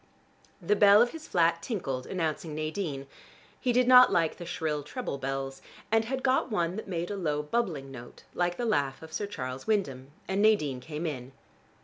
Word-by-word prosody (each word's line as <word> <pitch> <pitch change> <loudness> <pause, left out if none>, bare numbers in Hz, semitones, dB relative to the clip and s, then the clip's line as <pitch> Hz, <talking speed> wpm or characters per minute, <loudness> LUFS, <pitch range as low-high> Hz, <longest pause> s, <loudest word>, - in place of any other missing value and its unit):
The 200 +3 +1
bell 205 0 +7
of 240 +2 +4
his 320 -1 -9
flat 170 -1 +2
tinkled 135 - -3
announcing 160 -3 -3
Nadine. 155 -3 -3 0.5
He 250 - +1
did 245 +1 +3
not 250 0 +8
like 165 -4 +1
the 175 - -8
shrill 155 -3 -2
treble 150 - -5
bells, 135 0 -4 0.3
and 225 0 +3
had 260 +2 -3
got 265 0 +2
one 175 -5 0
that 220 - -6
made 175 0 -3
a - - -2
low 150 -6 -1
bubbling 150 -7 -2
note 120 -2 -11
like 175 0 0
the 245 - -2
laugh 140 - 0
of 160 - -11
Sir 205 - -2
Charles 130 -9 -6
Wyndham; 140 -12 -1 0.2
and 195 +1 0
Nadine 155 -12 +3
came 150 +5 -6
in. 130 -4 -5
170 Hz, 190 wpm, -29 LUFS, 140-210 Hz, 0.5 s, not